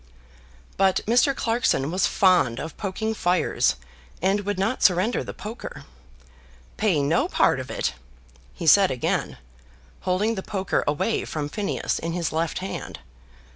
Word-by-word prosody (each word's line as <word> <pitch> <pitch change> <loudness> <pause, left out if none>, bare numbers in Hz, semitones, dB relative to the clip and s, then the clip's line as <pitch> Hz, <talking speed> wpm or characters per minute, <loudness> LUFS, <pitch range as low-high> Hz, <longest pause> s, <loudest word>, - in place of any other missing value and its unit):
But 190 -1 +3
Mr. 250 +5 +3
Clarkson 225 - 0
was 185 +2 +2
fond 180 -11 +3
of 160 - -6
poking 220 +2 -3
fires, 180 - +1 0.4
and 195 +4 +2
would 205 -2 -1
not 220 +7 -1
surrender 185 +5 +3
the - - -6
poker. 220 +3 -8 0.9
"Pay 185 -9 +1
no 155 +4 +2
part - - +2
of - - -7
it!" - - -2 0.6
he - - -6
said 195 +4 +6
again, 125 - -2 0.6
holding 190 +5 0
the 190 - -4
poker 195 -1 -1
away 150 +10 0
from 150 -2 -4
Phineas 205 +5 -2
in 165 +1 -3
his 170 -2 -2
left 160 +1 -1
hand. - - -6
190 Hz, 140 wpm, -24 LUFS, 165-215 Hz, 0.9 s, said